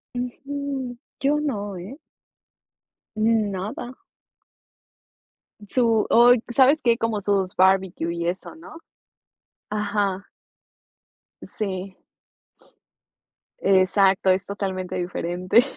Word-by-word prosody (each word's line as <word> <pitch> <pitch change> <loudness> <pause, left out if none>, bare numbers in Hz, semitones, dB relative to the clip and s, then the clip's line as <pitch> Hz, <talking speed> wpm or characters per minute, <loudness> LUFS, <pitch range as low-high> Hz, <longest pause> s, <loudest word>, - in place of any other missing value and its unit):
Ujú. 270 +1 -4 0.2
Yo 290 +2 +2
no, 205 -9 -3
¿eh? 195 +10 -9 1.2
Mm, 215 -1 +2
nada. 205 +6 -5 1.8
Su 230 -3 +2
oy, 240 0 +6
sabes 270 +5 +4
que 235 -1 +3
como 225 -3 -1
sus 195 -2 0
barbecue 190 -3 +2
y 170 0 -3
eso, 185 - -4
¿no? 325 0 -12 0.9
Ajá. 205 -2 -1 1.2
Sí. 190 -2 -5 1.6
Exacto, 195 0 +3
es 185 +1 +2
totalmente 190 -2 -4
diferente. 180 +4 +1
205 Hz, 85 wpm, -23 LUFS, 190-245 Hz, 1.8 s, oy